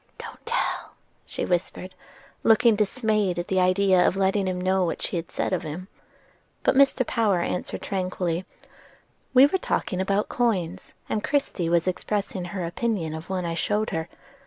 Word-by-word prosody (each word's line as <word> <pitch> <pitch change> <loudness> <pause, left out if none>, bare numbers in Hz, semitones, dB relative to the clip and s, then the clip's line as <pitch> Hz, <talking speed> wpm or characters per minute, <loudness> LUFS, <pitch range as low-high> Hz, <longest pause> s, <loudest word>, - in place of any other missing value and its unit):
"Don't - - -10
tell," 480 +2 -1 0.3
she - - -3
whispered, 185 +1 -2 0.5
looking 225 0 +5
dismayed 210 -3 +1
at 175 - -3
the 190 - +2
idea 185 0 +4
of 190 - 0
letting 195 0 +1
him 185 -1 -1
know 185 +1 +2
what 170 - -2
she - - -2
had 165 -1 -3
said - - -2
of 185 - 0
him. 175 +4 -7 0.7
But - - +4
Mr. 270 -1 +4
Power 215 -7 +1
answered 180 - -3
tranquilly: 185 -2 -2 0.9
"We 260 +2 +9
were 375 +7 +1
talking 185 - -1
about 195 +2 +1
coins, 190 -7 -1
and 210 - -2
Christie 275 -12 0
was 170 +1 +2
expressing 190 0 -2
her 180 0 -4
opinion 175 -2 -2
of 160 +2 -7
one 185 -2 -2
I 170 - -2
showed 210 +6 0
her. 160 0 -3
190 Hz, 165 wpm, -25 LUFS, 175-210 Hz, 0.9 s, We